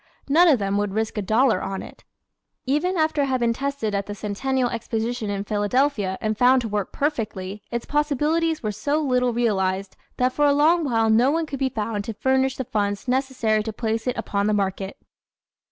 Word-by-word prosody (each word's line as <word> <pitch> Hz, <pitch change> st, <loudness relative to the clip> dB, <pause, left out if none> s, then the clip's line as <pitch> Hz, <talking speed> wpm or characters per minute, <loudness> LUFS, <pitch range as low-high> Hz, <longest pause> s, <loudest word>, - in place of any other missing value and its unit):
None 330 Hz, +6 st, +5 dB
of 295 Hz, -6 st, +5 dB
them 200 Hz, -1 st, -1 dB
would 205 Hz, -1 st, -2 dB
risk 220 Hz, 0 st, -1 dB
a -, -, 0 dB
dollar 220 Hz, +1 st, +2 dB
on 195 Hz, -1 st, -4 dB
it. -, -, -13 dB, 0.6 s
Even 300 Hz, +8 st, 0 dB
after 315 Hz, -2 st, +1 dB
it 280 Hz, -, +1 dB
had 260 Hz, -1 st, 0 dB
been 235 Hz, -1 st, +2 dB
tested 275 Hz, -5 st, -3 dB
at 200 Hz, -1 st, -2 dB
the 205 Hz, -, -5 dB
Centennial 245 Hz, +6 st, -1 dB
Exposition 230 Hz, -1 st, -3 dB
in 200 Hz, -1 st, -2 dB
Philadelphia 205 Hz, -1 st, 0 dB
and 215 Hz, 0 st, -1 dB
found 250 Hz, +3 st, +4 dB
to -, -, -2 dB
work 205 Hz, -2 st, -2 dB
perfectly, 210 Hz, -9 st, -3 dB
its 235 Hz, 0 st, -3 dB
possibilities 300 Hz, +2 st, 0 dB
were 215 Hz, -, -1 dB
so 285 Hz, +9 st, -1 dB
little 250 Hz, -4 st, +1 dB
realized 195 Hz, -5 st, 0 dB, 0.2 s
that 255 Hz, 0 st, +1 dB
for 295 Hz, 0 st, +3 dB
a 285 Hz, -, +4 dB
long 320 Hz, +4 st, +4 dB
while 225 Hz, -4 st, +2 dB
no 235 Hz, +4 st, +4 dB
one 325 Hz, +2 st, 0 dB
could 275 Hz, -3 st, -6 dB
be 270 Hz, -, +1 dB
found 215 Hz, -3 st, -3 dB
to 225 Hz, -, -5 dB
furnish 265 Hz, +3 st, +1 dB
the 260 Hz, -, -2 dB
funds 205 Hz, 0 st, -2 dB
necessary 250 Hz, -4 st, +1 dB
to 220 Hz, +1 st, -4 dB
place 225 Hz, +1 st, -2 dB
it 250 Hz, -, -1 dB
upon 200 Hz, 0 st, -1 dB
the 215 Hz, -, +2 dB
market. 195 Hz, -1 st, -2 dB
235 Hz, 200 wpm, -23 LUFS, 210-275 Hz, 0.6 s, None